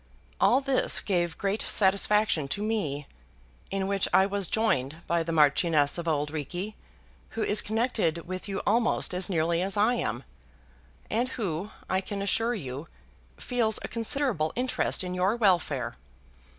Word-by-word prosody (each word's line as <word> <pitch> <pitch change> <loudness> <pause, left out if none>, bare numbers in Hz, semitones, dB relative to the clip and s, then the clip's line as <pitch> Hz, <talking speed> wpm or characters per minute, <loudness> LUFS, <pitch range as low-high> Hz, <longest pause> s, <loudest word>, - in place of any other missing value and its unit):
All 260 +3 +4
this 270 -1 +2
gave 175 -4 -1
great 200 +2 -1
satisfaction 200 -5 +2
to 200 +9 -2
me, 155 -11 -2 0.6
in 195 0 -1
which 195 -1 +1
I 190 - +5
was 200 -1 -1
joined 155 - 0
by 170 0 +1
the 165 0 -3
Marchioness 150 0 +3
of 170 - -5
Auld 150 -2 0
Reekie, 175 +7 -4 0.6
who 225 - +1
is 210 - +2
connected 215 -7 -1
with 185 +2 -5
you 195 - -3
almost 230 -2 +2
as 180 +2 0
nearly 170 -1 +1
as 195 +2 -1
I 215 +4 +4
am, 240 - -2 0.9
and 240 +4 +1
who, 195 -5 -3 0.2
I 190 0 0
can 200 +1 -4
assure 225 +4 +1
you, 140 - -6 0.5
feels 235 -3 0
a - - -3
considerable 230 - -1
interest 250 -5 0
in 180 0 -4
your 185 +4 +1
welfare. 165 - +1
190 Hz, 150 wpm, -28 LUFS, 165-220 Hz, 0.9 s, I